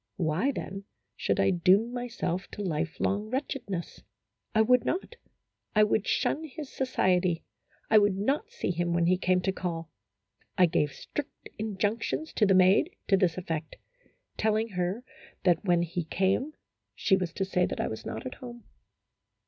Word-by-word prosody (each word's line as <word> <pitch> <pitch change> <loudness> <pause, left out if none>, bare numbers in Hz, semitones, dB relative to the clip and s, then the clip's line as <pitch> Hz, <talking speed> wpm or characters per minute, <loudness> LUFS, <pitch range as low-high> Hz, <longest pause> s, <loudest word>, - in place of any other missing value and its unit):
Why, 175 - +1
then, 195 -6 -6 0.3
should - - 0
I - - +4
doom 190 +6 +3
myself 225 -7 -3
to 205 - -4
life 165 -2 -2
long 205 +2 0
wretchedness? 255 - -4 0.5
I 220 - +6
would 250 +1 +4
not. 385 +6 -2 0.6
I 215 - +6
would 210 -1 +1
shun 310 - +1
his 300 -1 -8
society; 185 -9 +1 0.4
I 215 - +7
would 205 -2 +2
not 275 - 0
see 475 - -2
him 175 0 -1
when 170 0 +2
he 180 +2 +4
came 185 0 +2
to 190 - +1
call. 165 -4 -4 0.7
I 185 - +7
gave 160 -4 +1
strict 290 - -7
injunctions 220 +8 -2
to 210 - +3
the 195 - +5
maid 190 - +4
to 195 - +6
this 185 -3 +2
effect, 165 -3 -4 0.6
telling 220 +1 +1
her 180 +4 -2 0.4
that 175 -3 +3
when 175 -2 +3
he 175 +1 -3
came 195 - 0 0.4
she 190 - +3
was 180 -3 -2
to 195 - -1
say 180 -2 +1
that - - -5
I - - 0
was 110 - -6
not - - -6
at 255 - -4
home. 240 -2 -10
195 Hz, 165 wpm, -29 LUFS, 175-230 Hz, 0.7 s, I